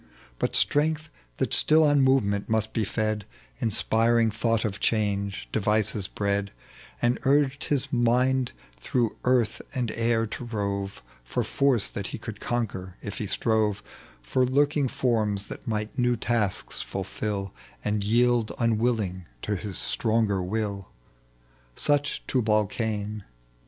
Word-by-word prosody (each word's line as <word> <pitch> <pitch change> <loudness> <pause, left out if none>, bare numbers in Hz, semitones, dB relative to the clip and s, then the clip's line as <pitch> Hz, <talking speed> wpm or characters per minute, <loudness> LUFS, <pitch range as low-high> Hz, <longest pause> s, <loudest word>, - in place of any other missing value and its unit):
But - - 0
strength 155 +1 +2 0.3
that - - 0
still 155 +1 +6
on 145 -2 +4
movement 110 -7 +2
must 110 0 0
be 110 - 0
fed, 110 +1 -1 0.4
Inspiring 115 +1 +3
thought 115 +1 0
of 100 -1 -3
change, 100 -3 0
devices 105 -1 +1
bred, 100 -1 -1 0.5
And 120 +1 +2
urged 140 +1 +2
his 140 0 0
mind 125 +1 +2 0.3
through 115 - 0
earth 125 -3 +2
and 125 -3 0
air 115 -1 +1
to 115 - -6
rove 100 -3 -3 0.2
For - - -1
force 135 -6 +1
that - - -5
he - - -5
could - - -8
conquer 95 -6 -3
if 100 - -5
he 105 - -2
strove, 105 0 +1 0.4
For 130 - +1
lurldi^ 140 +2 +2
forms 105 -6 0
that - - -8
might 110 +3 -2
new 120 -1 +2
tasks 110 -4 -1
fulfil 100 -3 -4 0.3
And 105 -1 0
yield 120 +1 +3
unwilling 110 -6 0 0.2
to 105 - -1
his 100 0 -5
stronger 110 -4 +1
will. 100 0 -2 0.9
Such 145 -1 0
Tubal 110 -4 +2
Cain. 105 -2 -3
110 Hz, 130 wpm, -26 LUFS, 105-125 Hz, 0.9 s, still